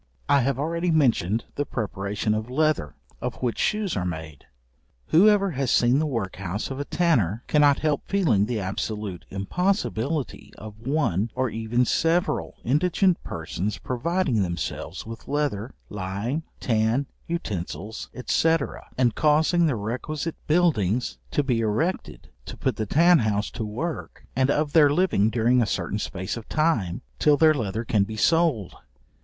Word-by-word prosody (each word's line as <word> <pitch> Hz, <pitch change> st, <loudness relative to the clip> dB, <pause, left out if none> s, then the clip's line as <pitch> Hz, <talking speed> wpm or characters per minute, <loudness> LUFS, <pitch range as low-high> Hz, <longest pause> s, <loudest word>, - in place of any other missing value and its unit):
I 140 Hz, -, +5 dB
have 135 Hz, +1 st, 0 dB
already 170 Hz, +4 st, -1 dB
mentioned 120 Hz, -, +2 dB
the 145 Hz, -, -1 dB
preparation 105 Hz, -4 st, -2 dB
of 110 Hz, +2 st, -3 dB
leather, 135 Hz, -, 0 dB, 0.3 s
of -, -, -3 dB
which 120 Hz, -2 st, -1 dB
shoes 210 Hz, -4 st, 0 dB
are 95 Hz, -, -1 dB
made. 80 Hz, -5 st, -6 dB, 0.6 s
Whoever 200 Hz, +2 st, +5 dB
has 135 Hz, -3 st, -1 dB
seen 125 Hz, +3 st, +4 dB
the 155 Hz, -, 0 dB
workhouse 100 Hz, -, -3 dB
of 135 Hz, -, -5 dB
a 145 Hz, -, -3 dB
tanner, 120 Hz, -, +1 dB
cannot 145 Hz, -2 st, +4 dB
help 150 Hz, -2 st, +1 dB
feeling 135 Hz, -, +2 dB
the 120 Hz, -2 st, -1 dB
absolute 100 Hz, 0 st, -4 dB
impossibility 145 Hz, -, -2 dB
of 110 Hz, +2 st, -10 dB
one, 120 Hz, -, +1 dB
or 130 Hz, -2 st, 0 dB
even 115 Hz, +2 st, 0 dB
several 165 Hz, +7 st, +1 dB
indigent 175 Hz, -, +2 dB
persons 85 Hz, +5 st, -4 dB
providing 130 Hz, -, 0 dB
themselves 85 Hz, -2 st, -4 dB
with 115 Hz, +1 st, -9 dB
leather, 140 Hz, -6 st, -2 dB
lime, 105 Hz, -, -3 dB
tan, 115 Hz, +3 st, +1 dB, 0.2 s
utensils, 105 Hz, -, -4 dB, 0.2 s
&c. 165 Hz, 0 st, +3 dB, 0.4 s
and 125 Hz, -3 st, +3 dB
causing 160 Hz, +4 st, +3 dB
the 140 Hz, -, +1 dB
requisite 130 Hz, +9 st, -4 dB
buildings 125 Hz, -, +1 dB
to 145 Hz, -, +1 dB
be 125 Hz, -4 st, +1 dB
erected 110 Hz, -, -2 dB, 0.2 s
to -, -, -7 dB
put -, -, -1 dB
the 110 Hz, -, -2 dB
tan 170 Hz, -, +5 dB
house 105 Hz, -2 st, 0 dB
to 115 Hz, -, -4 dB
work, 120 Hz, +11 st, -5 dB
and 130 Hz, 0 st, +2 dB
of 145 Hz, 0 st, +1 dB
their 150 Hz, -3 st, +6 dB
living 145 Hz, -, +2 dB
during 120 Hz, +2 st, +3 dB
a 115 Hz, -, +1 dB
certain 100 Hz, +2 st, -2 dB
space 95 Hz, -2 st, -4 dB
of 115 Hz, -, -9 dB
time, 130 Hz, -, 0 dB, 0.2 s
till 145 Hz, -1 st, +4 dB
their 160 Hz, 0 st, +6 dB
leather 115 Hz, -4 st, -3 dB
can 105 Hz, -3 st, +2 dB
be 110 Hz, +2 st, -6 dB
sold. 145 Hz, -, +2 dB
125 Hz, 150 wpm, -25 LUFS, 105-155 Hz, 0.6 s, their